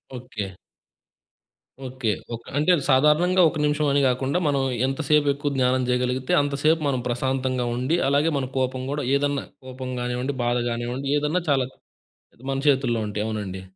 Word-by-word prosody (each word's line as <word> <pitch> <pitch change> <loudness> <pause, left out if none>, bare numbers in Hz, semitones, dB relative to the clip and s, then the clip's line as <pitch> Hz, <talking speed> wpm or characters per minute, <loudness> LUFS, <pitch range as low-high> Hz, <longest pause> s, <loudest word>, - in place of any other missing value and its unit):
Okay. 105 -7 -6 1.3
Okay. 125 -3 -2 0.2
ఒక 115 - -11
అంటే, 150 +4 +1
అది 145 - -3
సాధారణంగా 150 +7 +4
ఒక 155 - -6
నిమిషం 150 0 +1
అని 140 - +3
గాకుండా, 130 +5 +1
మనం 140 -2 +1 0.2
ఎంత 135 +4 -2
సేపెక్కువ 145 -1 +2
జ్ఞానం 130 0 +2
జేయగలిగితే, 125 +1 0
అంతసేపు 145 +3 +1
మనం 130 -3 0
ప్రశాంతంగా 130 0 -1
ఉండి, 130 +7 0
అలాగే 145 +3 +3
మన 130 - -2
కోపం 130 0 -1
గూడా, 145 -1 -2
ఏదన్నా 145 0 -1 0.2
కోపం 130 0 -6
గానివ్వండి, 125 +3 -2
బాధ 120 0 +1
గానివ్వండి, 120 +3 -3
ఏదన్నా 150 +5 0
చాలా 135 -3 +3 0.7
అది 125 - -20
మన 135 - -1
చేతుల్లో 130 -4 +2
ఉంటాయి. 105 +1 -3
అవునండి. 100 -4 -4
130 Hz, 155 wpm, -24 LUFS, 125-145 Hz, 1.3 s, సాధారణంగా